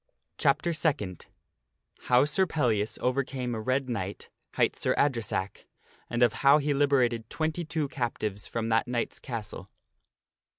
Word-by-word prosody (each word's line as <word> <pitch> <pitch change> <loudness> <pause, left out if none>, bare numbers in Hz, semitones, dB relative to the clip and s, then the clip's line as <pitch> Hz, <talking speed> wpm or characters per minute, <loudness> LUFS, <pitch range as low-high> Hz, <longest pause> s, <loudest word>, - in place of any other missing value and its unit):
Chapter 170 - +2
Second. 140 - -1 0.8
How 125 +2 +5
Sir 185 +6 +1
Pellias 115 -9 0
Overcame 125 -1 -1
a 110 - -3
Red 130 +3 0
Knight, 100 -5 -4 0.2
Higkt - - +2
Sir - - 0
Adresack, 115 -8 -1 0.4
and 120 0 +2
of 120 - +4
How 140 +1 +7
He 145 -1 0
Liberated 130 -5 +2
XXII 160 -1 -2
Captives 110 -7 -3
From 115 -1 -3
That 115 +2 +2
Knight's 120 -1 -2
Castle. 115 -5 -6
125 Hz, 130 wpm, -28 LUFS, 115-145 Hz, 0.8 s, How